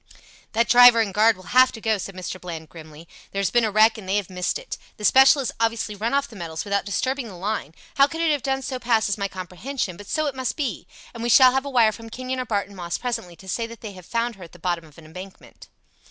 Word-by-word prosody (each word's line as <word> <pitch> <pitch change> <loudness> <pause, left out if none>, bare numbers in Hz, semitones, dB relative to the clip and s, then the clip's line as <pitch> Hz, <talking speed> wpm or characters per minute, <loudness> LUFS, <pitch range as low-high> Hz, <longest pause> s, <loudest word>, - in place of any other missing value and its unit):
"That 230 +1 +2
driver 245 -1 +8
and 210 -4 0
guard 220 +1 +4
will 185 +1 -11
have 255 0 +6
to 225 - -8
go," 220 -2 0
said 195 +1 -7
Mr. 185 0 -6
Bland, 165 -3 -7
grimly. 160 0 -13 0.2
"There 195 - -3
has 200 - 0
been 240 -1 +3
a 220 - +1
wreck 220 +2 +4
and 190 -3 -10
they 195 - +1
have 200 -2 -2
missed 180 -1 -1
it. - - -8 0.2
The 210 - -4
special 265 +4 +6
has 255 - -2
obviously 230 -1 0
run 215 +3 -2
off 280 0 +1
the 225 - -14
metals 165 -3 -5
without 200 0 -1
disturbing 255 +5 -2
the 195 - -10
line 180 -5 -4 0.2
how 275 - +7
it - - -7
could 325 - -6
have 305 -4 +1
done 270 +1 -1
so 260 -2 -4
passes 225 -4 +1
my 200 -1 -2
comprehension 185 +3 -5
but 205 0 -11
so 310 - -1
it 285 - -1
must 260 -2 -3
be, 265 - -3 0.3
and 230 - -8
we 235 - -1
shall 255 +2 +7
have 265 +2 -1
a - - -4
wire 235 -5 +4
from 225 +1 -10
Kenyon 255 +2 -4
or 255 - -2
Barton 205 -3 -2
Moss 175 -2 -4
presently 225 -8 -4
to 190 - -16
say 230 +5 -2
that 230 -1 -12
they 215 - -7
have 185 -3 -13
found 235 -2 -2
her 185 - -11
at 170 - -13
the - - -13
bottom 175 -1 -2
of 150 -2 -19
an 165 - -14
embankment." 185 +5 -12
220 Hz, 270 wpm, -23 LUFS, 185-245 Hz, 0.3 s, driver